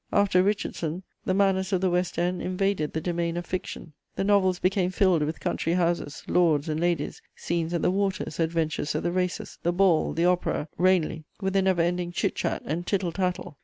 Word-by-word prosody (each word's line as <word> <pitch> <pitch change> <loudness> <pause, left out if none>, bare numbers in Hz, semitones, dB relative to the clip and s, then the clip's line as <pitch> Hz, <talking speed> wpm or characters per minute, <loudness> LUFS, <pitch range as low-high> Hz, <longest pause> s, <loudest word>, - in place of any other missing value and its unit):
After 200 -3 +4
Richardson, 185 -3 -1 0.2
the 185 - +1
manners 190 -1 +2
of 190 - +2
the 190 - +2
West 180 0 0
End 175 +1 0
invaded 185 -4 -1
the 160 - -2
domain 170 0 -1
of 175 - -4
fiction: 170 -3 -5 0.2
the - - -1
novels 195 -2 +3
became 185 0 +1
filled 185 -3 +3
with 155 +2 -2
country 165 - -1
houses, 170 -4 -1
lords 160 -4 +3
and 155 0 -1
ladies, 170 -3 -1
scenes 170 -1 -2
at 170 - -1
the - - +3
waters, 195 -5 -1
adventures 160 -2 0
at 155 - -1
the 175 - 0
races, 180 0 -2
the 175 - +1
ball, 175 -3 +3
the 165 +2 +1
opera, 180 -3 +1
Ranelagh, 175 -4 +2
with 195 -1 -2
a 195 - +5
never 185 -3 +2
ending 175 0 -1
chit - - 0
chat - - -2
and 170 +4 -3
tittle 190 -4 0
tattle. 180 -5 -3
175 Hz, 200 wpm, -26 LUFS, 165-190 Hz, 0.2 s, a